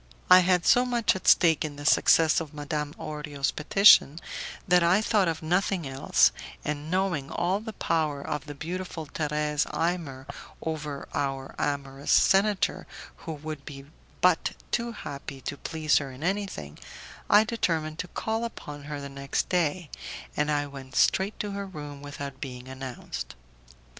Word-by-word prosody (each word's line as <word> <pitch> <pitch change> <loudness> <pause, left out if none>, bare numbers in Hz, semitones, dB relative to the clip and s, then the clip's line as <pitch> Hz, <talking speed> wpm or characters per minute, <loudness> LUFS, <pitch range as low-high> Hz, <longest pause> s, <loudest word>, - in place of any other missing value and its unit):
I 185 - +11
had 180 -1 +2
so 245 - +6
much 240 -5 +1
at 190 - -6
stake 165 -4 +5
in 150 -2 -4
the 145 0 -9
success 160 +1 +5
of 155 -2 -8
Madame 150 0 -3
Orio's 150 -2 -3
petition, 160 -2 +6 0.5
that 180 -1 +5
I 170 +4 +4
thought 215 -3 +2
of 165 -1 -2
nothing 180 0 0
else, 135 0 +3 0.3
and 150 +1 -3
knowing 180 -6 0
all 180 +4 0
the 220 0 -7
power 155 -6 0
of 150 0 -4
the 145 - -7
beautiful 170 +1 -5
Thérèse 150 0 -1
Imer 165 -6 -2 0.3
over 150 -3 -4
our 135 -1 -2
amorous 140 -1 -2
senator, 195 +1 +3 0.4
who 160 - -2
would 155 -1 -7
be 135 -1 -9 0.4
but - - +3 0.2
too 235 0 0
happy 140 -9 -7
to 145 - -4
please 155 +1 +1
her 140 -2 -5
in 130 +3 -10
anything, 185 - -3 0.5
I 210 +1 +7
determined 165 -8 -1
to 180 - -3
call 225 +5 -2
upon 145 -11 -7
her 145 -1 -5
the 140 - -6
next 140 0 -3
day, 175 -2 0 0.4
and 150 0 0
I 145 -1 +1
went 135 -2 -10
straight 195 +2 +2
to 205 - -4
her 200 0 -4
room 145 -5 -8
without 145 -1 -7
being 125 -2 -7
announced. 130 - -7
155 Hz, 160 wpm, -27 LUFS, 140-180 Hz, 0.5 s, I